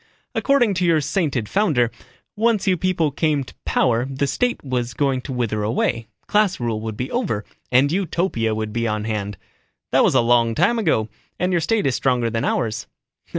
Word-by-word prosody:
"According 260 -7 +2
to 185 0 -1
your 165 -2 +4
sainted 145 - -1
founder, 145 - +2 0.4
once 225 -1 +1
you 190 - +3
people 170 -3 0
came 150 0 0
to - - -13
power 120 -2 +2
the 135 +1 -1
State 245 - -1
was 125 -3 -2
going 135 -3 +1
to 135 - -7
wither 115 -4 -1
away, 115 +1 -1 0.2
class 210 -3 +2
rule 115 -3 -2
would 110 -1 -5
be 125 - -4
over, 185 - -1 0.3
and 130 +3 +4
Utopia 170 - 0
be 115 +2 -2
on 105 -1 -1
hand. 105 -3 -3 0.5
That - - +4
was - - +3
a - - +6
long 115 -1 +3
time 215 +8 +2
ago, 150 - +1 0.3
and 180 +1 0
your 175 - +2
State 210 +7 +1
is 135 - +2
stronger 125 -3 +1
than 115 0 -1
ours." 115 0 -1
130 Hz, 185 wpm, -21 LUFS, 115-180 Hz, 0.5 s, a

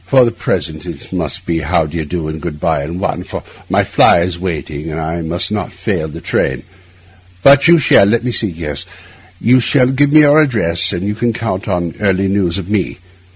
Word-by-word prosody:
For 130 -2 +5
the 115 - 0
present 80 -8 -3
it - - -9
must - - -3
be 85 -1 -1
how 80 +1 0
d'ye 80 +1 -4
do 80 0 -4
and 80 0 -6
good 75 -2 -6
bye 80 -3 0
in 85 +4 -5
one, 95 - -2
for - - -7 0.3
my - - +2
fly 85 - +4
is 85 0 -2
waiting, 80 -3 -5
and 80 +1 -4
I 80 +2 -3
must 85 +5 -1
not 105 -1 -3
fail 90 -3 -3
the 75 - -9
train; - - -1 0.8
but 140 +2 +6
you 170 0 +7
shall—let 120 -5 +3
me 125 - -1
see—yes—you 85 - -2
shall 125 +1 +2
give 140 +2 +2
me 155 0 +7
your 150 +1 +5
address, 105 - +2
and 85 +2 -3
you 105 - -1
can 115 +2 -1
count 110 -3 -4
on 90 -4 -2
early 95 -2 +1
news 95 -3 0
of 95 -3 -6
me. 105 -3 -2
90 Hz, 200 wpm, -15 LUFS, 80-115 Hz, 0.8 s, you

